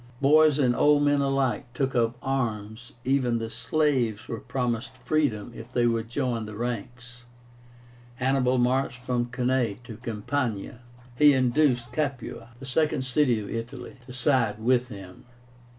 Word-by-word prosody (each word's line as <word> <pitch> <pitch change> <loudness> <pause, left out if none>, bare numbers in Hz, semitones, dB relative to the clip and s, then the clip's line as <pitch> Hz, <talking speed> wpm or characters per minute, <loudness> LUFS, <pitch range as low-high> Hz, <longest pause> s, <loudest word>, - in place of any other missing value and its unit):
Boys 150 +1 +5
and 125 -4 +2
old 145 +2 +4
men 145 -1 +3
alike 135 -2 0
took 135 +1 0
up 115 0 +1
arms 115 -3 -3
even 130 -3 +2
the 115 -1 -4
slaves 130 -10 0
were 115 - -4
promised 125 +1 -3
freedom 125 -5 0
if 115 +2 -10
they 120 -1 +2
would 115 -1 0
join 120 -4 -2
the 105 - -8
ranks. 120 +2 -5 0.9
Hannibal 130 -1 +1
marched 125 +1 +1
from 125 -1 -2
Cannae 125 -2 0
into 115 +1 -11
Campania. 115 0 -3 0.4
He 145 +2 +6
induced 130 -1 +2
Capua, 135 -6 -3
the 135 - -9
second 135 0 0
city 125 -3 +2
of 100 - -7
Italy, 125 +3 -6
to - - -9
side 125 -4 +1
with 125 +2 +2
him. 95 -5 -11
125 Hz, 145 wpm, -26 LUFS, 115-135 Hz, 0.9 s, He